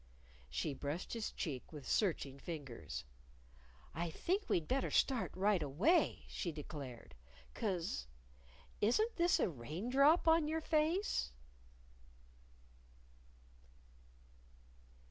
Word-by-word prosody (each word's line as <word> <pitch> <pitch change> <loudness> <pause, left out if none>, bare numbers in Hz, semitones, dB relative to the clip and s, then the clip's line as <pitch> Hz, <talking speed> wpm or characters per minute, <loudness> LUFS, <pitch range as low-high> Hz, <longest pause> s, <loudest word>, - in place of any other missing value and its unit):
She 60 - -1
brushed 145 +6 -4
his 230 -2 -2
cheek 140 -8 -4
with 145 -5 -8
searching 145 -9 0
fingers. 135 - -6 0.9
"I 170 +2 -2
think 380 - -1
we'd 165 -3 +1
better 265 +1 +1
start 260 -4 +2
right 195 -1 +3
away," 175 - +2
she 175 - -3
declared. 145 -5 -8 0.4
"'Cause 175 - -2 0.7
isn't 430 - +2
this 345 0 +4
a - - +3
rain 160 - -5
drop 290 +6 +5
on 320 -1 +5
your 320 +1 -1
face?" 315 - +1
180 Hz, 100 wpm, -37 LUFS, -, 0.9 s, drop